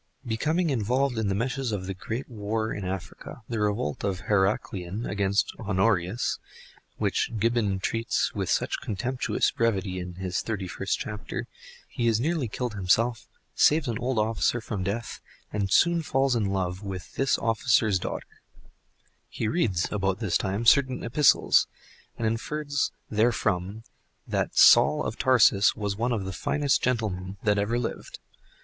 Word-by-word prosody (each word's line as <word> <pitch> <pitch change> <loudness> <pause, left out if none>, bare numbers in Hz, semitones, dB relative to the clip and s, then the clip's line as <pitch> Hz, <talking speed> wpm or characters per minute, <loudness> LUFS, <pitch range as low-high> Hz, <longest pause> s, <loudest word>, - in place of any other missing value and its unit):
Becoming 155 +9 0
involved 125 +1 0
in 110 - 0
the 95 - 0
meshes 125 +3 -2
of 100 -3 -3
the 95 - -3
great 115 +7 -5
war 110 -1 -3
in 100 - -5
Africa—that 95 +5 -6
revolt 105 -8 -1
of 95 -2 -2
Heraclian 95 0 -1
against 100 0 0
Honorius 95 0 0 0.6
which - - 0
Gibbon 110 -3 +1
treats 115 +4 -1
with - - -3
such - - 0
contemptuous 125 +5 -1
brevity 100 -5 0
in 90 -1 -7
his 95 -1 -2
thirty 105 -5 -4
first - - -2
chapter—he 105 +2 -6
is 115 -1 +3
nearly 155 0 0
killed 120 +1 -4
himself, 110 +4 +1 0.3
saves 155 -1 +3
an 115 -1 -2
old 125 0 -1
officer 110 +2 +1
from 110 -3 -4
death 100 +5 -3 0.3
and 100 -2 -1
soon 170 - +4
falls 135 -4 +1
in 110 -3 +1
love 95 -1 -2
with 95 -4 -7
this 135 -1 +1
officer's 110 -3 +2
daughter. - - -6 0.9
He 110 - -3
reads 105 - +1
about 95 -2 0
this 105 -5 -1
time 100 +3 -1
certain 130 +1 +4
epistles, 140 +5 +4 0.5
and 115 - -2
infers 140 +5 -1 0.2
therefrom 110 -2 0 0.4
that - - -2
Saul - - +7
of - - -4
Tarsus 115 -6 +5
was 105 -2 -2
one 120 +4 -1
of 105 -5 -1
the 95 - -4
finest 145 +8 +1
gentlemen 100 -6 -2
that 105 -2 +2
ever 110 +4 0
lived. 120 - -4
110 Hz, 145 wpm, -26 LUFS, 95-120 Hz, 0.9 s, Saul